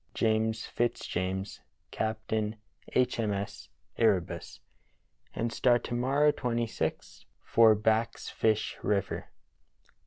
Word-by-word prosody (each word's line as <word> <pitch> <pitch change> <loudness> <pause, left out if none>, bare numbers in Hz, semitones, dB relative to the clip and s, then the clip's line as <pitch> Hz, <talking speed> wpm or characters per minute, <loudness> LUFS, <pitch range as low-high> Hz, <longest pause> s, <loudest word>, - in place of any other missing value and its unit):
James 110 0 +1
Fitzjames, 95 -4 -2 0.3
Captain 110 0 -2 0.4
H. 125 -1 +2
M. 110 -2 +1
S. 100 +1 -5 0.3
Erebus. 100 -6 +1 0.8
*'And 115 0 -1
start 120 -1 +3
to - - -5
morrow, 135 +5 +3
26th, 120 -4 -3 0.2
for 115 -1 +6
Back's 110 +2 0
Fish 110 -1 0
River. 100 -2 -1
110 Hz, 95 wpm, -30 LUFS, 105-120 Hz, 0.8 s, for